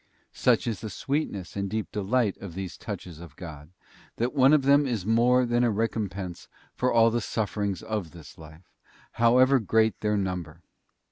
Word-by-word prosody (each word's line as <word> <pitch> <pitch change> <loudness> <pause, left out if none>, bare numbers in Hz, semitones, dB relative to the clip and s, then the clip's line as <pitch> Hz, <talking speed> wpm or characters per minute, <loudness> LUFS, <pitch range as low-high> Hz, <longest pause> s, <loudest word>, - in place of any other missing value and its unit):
Such - - +2
is 110 -5 -2
the 110 - -6
sweetness 105 - -3
and 100 -1 -2
deep 110 +1 -3
delight 105 +1 0
of 90 -4 -9
these 95 -1 -5
touches 85 -3 -8
of 85 -4 -12
God, 75 -4 -10 0.5
that 120 +2 -1
one 135 0 +5
of 150 -3 +4
them 140 +1 +4
is 110 -7 -2
more 120 +3 +3
than 120 0 +1
a 120 - +3
recom 110 -1 -1
pense 90 -2 -7 0.3
for 125 0 0
all 115 0 +5
the 120 +1 0
sufferings 105 -3 -2
of 105 -6 -3
this 80 -4 -13
life, 80 +2 -14 0.4
however 130 +3 +4
great 110 0 +1
their 105 -1 0
number. 90 -4 -4
105 Hz, 180 wpm, -26 LUFS, 90-120 Hz, 0.5 s, one